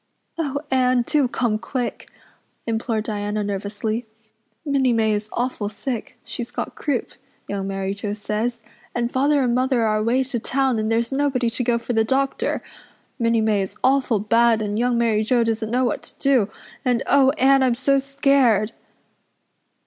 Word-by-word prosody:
"Oh, 285 Hz, -3 st, -1 dB
Anne, 255 Hz, -1 st, +3 dB
do 290 Hz, -2 st, +2 dB
come 235 Hz, -3 st, 0 dB
quick," 250 Hz, +1 st, -4 dB, 0.6 s
implored 225 Hz, -1 st, -1 dB
Diana 210 Hz, 0 st, -2 dB
nervously. 205 Hz, +3 st, -3 dB, 0.6 s
"Minnie 270 Hz, -4 st, +2 dB
May 220 Hz, -1 st, +2 dB
is 210 Hz, +1 st, -3 dB
awful 240 Hz, -4 st, -2 dB
sick 255 Hz, +4 st, -5 dB
she's 240 Hz, -1 st, -6 dB
got -, -, -4 dB
croup. 280 Hz, -6 st, -2 dB, 0.4 s
Young 195 Hz, -1 st, -3 dB
Mary 195 Hz, 0 st, -2 dB
Joe 205 Hz, 0 st, -4 dB
says 215 Hz, +3 st, -2 dB, 0.3 s
and 240 Hz, 0 st, -1 dB
Father 280 Hz, +1 st, +2 dB
and 245 Hz, -1 st, +1 dB
Mother 255 Hz, -1 st, +2 dB
are 215 Hz, -1 st, +2 dB
away 235 Hz, +5 st, +2 dB
to 255 Hz, -2 st, -3 dB
town 265 Hz, 0 st, 0 dB
and 215 Hz, +1 st, -1 dB
there's 230 Hz, +2 st, +1 dB
nobody 270 Hz, -4 st, +1 dB
to 250 Hz, -, -2 dB
go 240 Hz, -1 st, +2 dB
for 235 Hz, +1 st, -4 dB
the 225 Hz, -1 st, +3 dB
doctor. 270 Hz, +4 st, 0 dB, 0.6 s
Minnie 230 Hz, -1 st, +2 dB
May 215 Hz, -2 st, +2 dB
is 190 Hz, -, -5 dB
awful 260 Hz, -3 st, +3 dB
bad 230 Hz, +2 st, +3 dB
and 210 Hz, 0 st, -2 dB
Young 245 Hz, 0 st, +2 dB
Mary 225 Hz, -2 st, +2 dB
Joe 235 Hz, +2 st, +2 dB
doesn't 225 Hz, -1 st, -1 dB
know 250 Hz, +2 st, +1 dB
what 240 Hz, -, -1 dB
to -, -, -12 dB
do 255 Hz, -7 st, +3 dB, 0.3 s
and 250 Hz, -1 st, +1 dB
oh, 275 Hz, -1 st, +5 dB
Anne, 270 Hz, 0 st, +5 dB
I'm 255 Hz, -2 st, +3 dB
so 275 Hz, +2 st, +2 dB
scared!" 275 Hz, -6 st, +2 dB
235 Hz, 170 wpm, -22 LUFS, 215-260 Hz, 0.6 s, oh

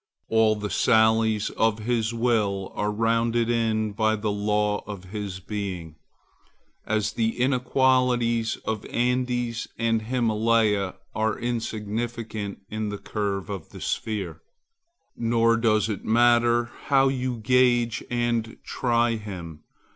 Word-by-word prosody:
All 110 Hz, -1 st, +4 dB
the 105 Hz, -1 st, -4 dB
sallies 110 Hz, -1 st, +3 dB
of 110 Hz, -1 st, +1 dB
his 115 Hz, 0 st, -1 dB
will 110 Hz, -5 st, 0 dB
are 105 Hz, -, -1 dB
rounded 115 Hz, +2 st, +1 dB
in 110 Hz, -2 st, 0 dB
by 110 Hz, +1 st, +1 dB
the 105 Hz, 0 st, -2 dB
law 105 Hz, 0 st, 0 dB
of 100 Hz, -3 st, -7 dB
his 100 Hz, -3 st, -5 dB
being, 95 Hz, -5 st, -5 dB, 0.9 s
as 110 Hz, 0 st, 0 dB
the 115 Hz, +1 st, -1 dB
inequalities 125 Hz, -3 st, +2 dB
of 110 Hz, -2 st, -2 dB
Andes 125 Hz, -1 st, -1 dB
and 115 Hz, -1 st, +1 dB
Himmaleh 110 Hz, -4 st, +1 dB, 0.2 s
are 110 Hz, 0 st, 0 dB
insignificant 110 Hz, -2 st, -4 dB
in 110 Hz, 0 st, -3 dB
the 105 Hz, -, -4 dB
curve 100 Hz, -2 st, -3 dB
of 95 Hz, -5 st, -6 dB
the -, -, -11 dB
sphere. 95 Hz, -8 st, -3 dB, 0.7 s
Nor 115 Hz, 0 st, +2 dB
does 110 Hz, -2 st, +2 dB
it 105 Hz, -3 st, -4 dB
matter 120 Hz, +1 st, +3 dB
how 135 Hz, -1 st, +4 dB
you 130 Hz, -2 st, -1 dB
gauge 120 Hz, 0 st, +2 dB
and 120 Hz, -2 st, -1 dB
try 120 Hz, -2 st, +1 dB
him. 90 Hz, -7 st, -8 dB
110 Hz, 120 wpm, -25 LUFS, 105-120 Hz, 0.9 s, All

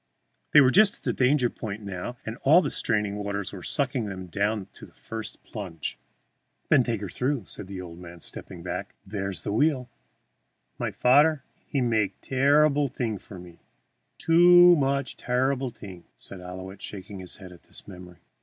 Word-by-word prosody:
They 150 Hz, -, +8 dB
were 130 Hz, -2 st, +5 dB
just 205 Hz, +4 st, +5 dB
at -, -, -20 dB
the -, -, 0 dB
danger 130 Hz, 0 st, +3 dB
point 110 Hz, -2 st, -6 dB
now, 100 Hz, +5 st, -5 dB
and 110 Hz, -, -4 dB
all 165 Hz, +7 st, +5 dB
the -, -, -2 dB
straining 105 Hz, -3 st, 0 dB
waters 100 Hz, -1 st, -3 dB
were 95 Hz, -, -7 dB
sucking 130 Hz, -, -1 dB
them 95 Hz, -2 st, -6 dB
down 100 Hz, +3 st, -1 dB
to -, -, -12 dB
the -, -, -23 dB
first 110 Hz, -1 st, -7 dB
plunge. 90 Hz, -8 st, -6 dB, 0.7 s
"Then 145 Hz, -, +6 dB
take 115 Hz, -4 st, -2 dB
her 100 Hz, -, -4 dB
through," 125 Hz, +2 st, -2 dB
said 95 Hz, -, -8 dB
the 95 Hz, -1 st, -7 dB
old 85 Hz, -1 st, -10 dB
man, 85 Hz, -1 st, -11 dB
stepping -, -, -9 dB
back; -, -, -5 dB
"there 95 Hz, -1 st, -3 dB
is 95 Hz, -, -6 dB
the 100 Hz, -, -2 dB
wheel." 130 Hz, -1 st, +1 dB, 0.9 s
"My -, -, -1 dB
fadder 145 Hz, +3 st, +4 dB, 0.2 s
he 140 Hz, -, -1 dB
make 110 Hz, -5 st, 0 dB
terreeble 145 Hz, +2 st, +3 dB
thing 115 Hz, -5 st, -3 dB
for 95 Hz, -, -12 dB
me 90 Hz, -1 st, -13 dB, 0.6 s
too 175 Hz, +1 st, +7 dB
much 140 Hz, -2 st, -1 dB
terreeble 130 Hz, +1 st, 0 dB
thing," 95 Hz, -6 st, -11 dB
said 100 Hz, -, -7 dB
Ouillette, 95 Hz, +2 st, -8 dB
shaking 100 Hz, 0 st, -8 dB
his 90 Hz, -1 st, -7 dB
head 95 Hz, -3 st, -11 dB
at 90 Hz, -, -15 dB
the -, -, -12 dB
memory. 90 Hz, -3 st, -12 dB
110 Hz, 180 wpm, -26 LUFS, 95-135 Hz, 0.9 s, They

